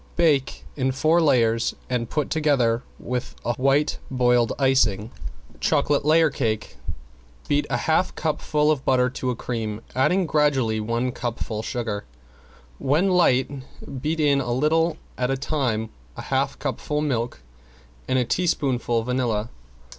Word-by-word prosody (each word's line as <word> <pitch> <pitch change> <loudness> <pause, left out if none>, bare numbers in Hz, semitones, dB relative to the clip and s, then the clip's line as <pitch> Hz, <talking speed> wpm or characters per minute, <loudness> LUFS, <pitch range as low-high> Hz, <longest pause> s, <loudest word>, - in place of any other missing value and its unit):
Bake 150 -6 +1
in 130 -2 0
four 155 +6 +3
layers 115 -6 +2
and 125 -3 -2
put 150 -2 -2
together 135 -7 +2 0.2
with 125 0 -4
a 120 - +1
white 135 +4 +1
boiled 125 -2 +2
icing. 120 -6 +2 0.5
~CHOCOLATE 145 -1 +2
LAYER 160 +1 +4
CAKE~ 110 -6 -2 0.7
Beat 145 0 +1
a 125 - +1
half 160 +8 +1
cupful 150 -1 +1
butter 125 -1 +2
to 130 - -3
a 125 - -1
cream, 110 -3 -4
adding 180 +8 +2
gradually 140 -8 +2
one 115 +3 -1
cupful 115 -3 -4
sugar. 110 -3 -3 0.8
When 155 +8 +2
light 135 -8 +3 0.5
beat 160 +3 -1
in 145 -2 +3
a 120 -2 -2
little 160 +4 +2 0.2
at 125 0 +1
a 135 - 0
time, 125 -6 -1 0.3
a - - -6
half - - +1
cupful 150 0 -2
milk 120 - -2 0.6
and 130 - +1
a 125 - +2
teaspoonful 125 -8 0
vanilla. 120 -3 -1
130 Hz, 135 wpm, -24 LUFS, 120-150 Hz, 0.8 s, LAYER